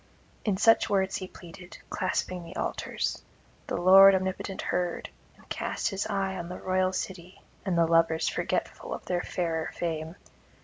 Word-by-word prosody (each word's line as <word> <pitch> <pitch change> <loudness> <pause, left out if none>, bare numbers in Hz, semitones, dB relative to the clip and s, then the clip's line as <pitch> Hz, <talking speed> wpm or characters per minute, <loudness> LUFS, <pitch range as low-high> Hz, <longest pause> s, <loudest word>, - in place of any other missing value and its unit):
In 205 -4 +1
such 225 +3 +5
words 190 -1 +1
he 185 - -6
pleaded, 180 0 -12
clasping 185 -1 -1
the 170 +2 -10
altars; - - -2 0.5
the - - -2
Lord 195 +2 +8
omnipotent 190 +1 -3
heard, 175 -1 -2 0.3
and - - -21
cast - - -2
his 195 0 -2
eye 195 -2 -1
on 170 -1 -6
the 180 - -6
royal 185 0 +1
city 185 -1 -6 0.2
and 180 -3 +1
the 170 - +5
lovers 165 -1 +3
forgetful - - -2
of - - -11
their 175 -1 0
fairer 165 -3 -2
fame. 160 -1 -3
185 Hz, 160 wpm, -28 LUFS, 170-190 Hz, 0.5 s, Lord